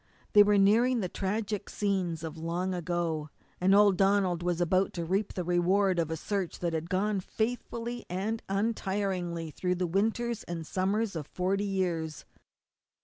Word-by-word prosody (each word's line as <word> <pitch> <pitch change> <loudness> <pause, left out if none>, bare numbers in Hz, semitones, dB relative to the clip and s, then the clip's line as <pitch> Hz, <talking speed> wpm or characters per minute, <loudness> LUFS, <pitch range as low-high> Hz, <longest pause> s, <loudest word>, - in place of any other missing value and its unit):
They 210 - +9
were 205 0 +5
nearing 230 +5 +4
the 185 - -1
tragic 205 +2 -2
scenes 185 -5 -1
of 160 -1 -5
long 170 +3 -2
ago, 170 -3 -2 0.3
and 190 +2 +4
old 200 -2 +5
Donald 195 -3 +2
was 175 -1 -1
about 185 +2 +2
to 170 -1 -3
reap 195 +4 0
the 180 - -2
reward 180 +2 +2
of 165 -2 0
a 160 - -2
search 195 +1 -3
that 170 -2 -2
had 160 +1 -3
gone 200 +2 +1
faithfully 235 +3 -3
and 205 +5 -2
untiringly 195 -5 -1
through 180 +3 -1
the 180 0 -1
winters 225 +6 0
and 165 -2 -5
summers 195 +4 0
of 150 -3 -4
forty 195 +4 -1
years. 175 -6 -2
190 Hz, 160 wpm, -29 LUFS, 175-205 Hz, 0.3 s, They